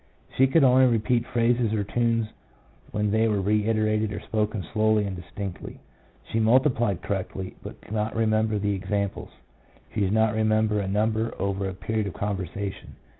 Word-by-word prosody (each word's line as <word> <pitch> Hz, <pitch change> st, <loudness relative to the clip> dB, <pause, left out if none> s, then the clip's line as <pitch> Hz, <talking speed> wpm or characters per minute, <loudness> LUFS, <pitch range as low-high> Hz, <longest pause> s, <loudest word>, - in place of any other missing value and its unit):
She 130 Hz, -, +5 dB
could 150 Hz, +3 st, +4 dB
only 130 Hz, 0 st, +6 dB
repeat 120 Hz, +1 st, +1 dB
phrases 120 Hz, -1 st, +1 dB
or 105 Hz, -2 st, 0 dB
tunes 115 Hz, +1 st, +1 dB, 0.6 s
when 105 Hz, -1 st, -1 dB
they 110 Hz, +1 st, +3 dB
were 105 Hz, -2 st, +1 dB
reiterated 110 Hz, +1 st, +1 dB
or -, -, -4 dB
spoken 105 Hz, -2 st, -2 dB
slowly 110 Hz, -1 st, +3 dB
and 100 Hz, -1 st, -4 dB
distinctly. 95 Hz, +1 st, -7 dB, 0.4 s
She 115 Hz, -, -2 dB
multiplied 120 Hz, -, +2 dB
correctly, 95 Hz, -1 st, -4 dB
but -, -, -10 dB
could -, -, -10 dB
not 110 Hz, 0 st, -1 dB
remember 110 Hz, -1 st, +1 dB
the 100 Hz, 0 st, 0 dB
examples; 100 Hz, +1 st, -3 dB, 0.6 s
she -, -, -2 dB
did 100 Hz, +1 st, +1 dB, 0.2 s
remember 110 Hz, -1 st, +2 dB
a 100 Hz, -, -2 dB
number 110 Hz, +3 st, 0 dB
over 100 Hz, 0 st, -1 dB
a 95 Hz, -, -7 dB
period 110 Hz, +2 st, -2 dB
of 95 Hz, -, -5 dB
conversation. 100 Hz, 0 st, -4 dB
110 Hz, 160 wpm, -25 LUFS, 100-115 Hz, 0.6 s, only